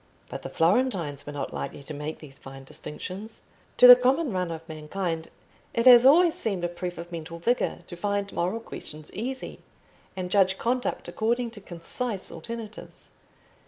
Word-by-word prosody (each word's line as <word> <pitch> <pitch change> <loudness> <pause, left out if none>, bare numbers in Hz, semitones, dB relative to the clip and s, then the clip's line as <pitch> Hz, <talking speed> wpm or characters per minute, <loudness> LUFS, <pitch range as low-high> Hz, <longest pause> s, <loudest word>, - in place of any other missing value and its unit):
But - - -6
the - - -6
Florentines 170 - +1
were - - -4
not 145 -1 -5
likely - - -5
to 155 - -7
make 150 +2 -5
these 140 -3 -13
fine 135 0 -11
distinctions. 185 +10 -7 0.3
To - - +8
the 250 0 +13
common 260 +3 +1
run 180 -2 -1
of 165 0 -7
mankind 165 +1 -4 0.5
it 230 - +1
has 250 0 +9
always 335 +4 +6
seemed 195 -5 -2
a - - +2
proof 175 +1 -6
of 170 +1 -8
mental 165 0 -6
vigour 240 +9 0
to 175 - -8
find 200 +2 -2
moral 185 +7 -1
questions 155 -8 -9
easy, 260 +5 -5 0.6
and 180 -1 -4
judge 190 -1 +4
conduct 245 +1 -1
according 235 +2 -1
to 215 -3 -11
concise 190 +5 -4
alternatives. 220 +6 -9
185 Hz, 165 wpm, -26 LUFS, 165-235 Hz, 0.6 s, the